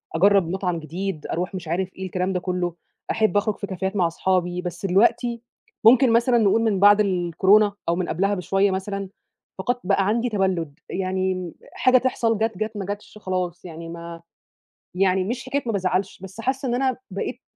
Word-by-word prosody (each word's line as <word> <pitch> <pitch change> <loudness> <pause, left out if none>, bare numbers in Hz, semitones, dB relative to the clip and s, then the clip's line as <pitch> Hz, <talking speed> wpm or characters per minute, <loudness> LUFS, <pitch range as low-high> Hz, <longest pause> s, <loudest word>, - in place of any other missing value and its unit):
أجرّب 195 0 +4
مطعم 180 -2 -1
جديد، 165 +1 -5
أروح 180 +3 -3
مش 175 -3 -6
عارف 185 +3 -2
إيه، 190 - -5
الكلام 185 +1 -2
ده 180 - 0
كلّه، 180 -1 -2 0.4
أحب 220 -2 +2
أخرج 210 0 +1
في 200 - -5
كافيهات 190 +2 -3
مع 180 -3 +3
أصحابي، 180 +1 0
بس 180 +1 -5
دلوقتي، 235 +5 +2 0.4
ممكن 240 0 +7
مثلًا 240 +1 +4
نقول 220 0 +3
من 215 -4 +1
بعد 205 +1 +7
الكورونا، 190 +2 +3 0.2
أو 170 - +2
من 180 -1 -2
قبلها 195 +4 +1
بشوية 195 +2 +1
مثلًا، 195 0 -3 0.5
فقدت 245 +6 -1
بقى 195 0 +2
عندي 235 +3 +1
تبلّد، 180 -7 -1
يعني 185 -2 -2 0.2
حاجة 255 0 +4
تحصل، 235 -3 +1
جات 220 -2 -1
جات، 215 +1 -3
ما 195 - -3
جاتش 205 +1 -7
خلاص 185 -4 -3
يعني 165 -1 -8
ما، 170 0 -8 0.7
يعني 190 0 +2
مش 240 +6 -4
حكاية 280 +2 -1
ما 230 - -1
بازعلش، 190 -1 -1
بس 190 +3 -9
حاسّة 265 +3 -1
إن 240 - +1
أنا 260 -1 0
بقيت، 200 +6 -4
190 Hz, 180 wpm, -23 LUFS, 180-215 Hz, 0.7 s, ممكن